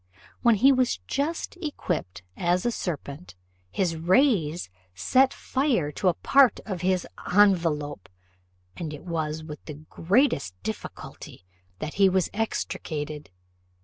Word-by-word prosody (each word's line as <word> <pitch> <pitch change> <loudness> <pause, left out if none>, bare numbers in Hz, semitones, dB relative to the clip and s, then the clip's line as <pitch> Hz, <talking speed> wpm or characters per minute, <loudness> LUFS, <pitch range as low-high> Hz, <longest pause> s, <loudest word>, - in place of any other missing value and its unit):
When 235 -2 +5
he 265 +7 +6
was 255 -2 +2
just 315 +6 -2
equipped 180 - -3
as 180 +3 +1
a 240 - +2
serpent, 155 - -5 0.3
his 165 - 0
rays 175 - +2 0.3
set 260 - +3
fire 255 - 0
to 180 +4 +2
part 265 +8 +4
of 190 -5 -4
his 185 -1 +1 0.3
envelope, 165 - +2 0.7
and 155 -3 -5
it 145 - -12
was 160 -2 -3
with 150 -1 -9
the 155 - -7
greatest 160 - +1
difficulty 105 -3 -7 0.3
that 155 +8 -5
he 195 - +7
was 185 -1 +1
extricated. 155 - -3
175 Hz, 120 wpm, -26 LUFS, 150-225 Hz, 0.7 s, he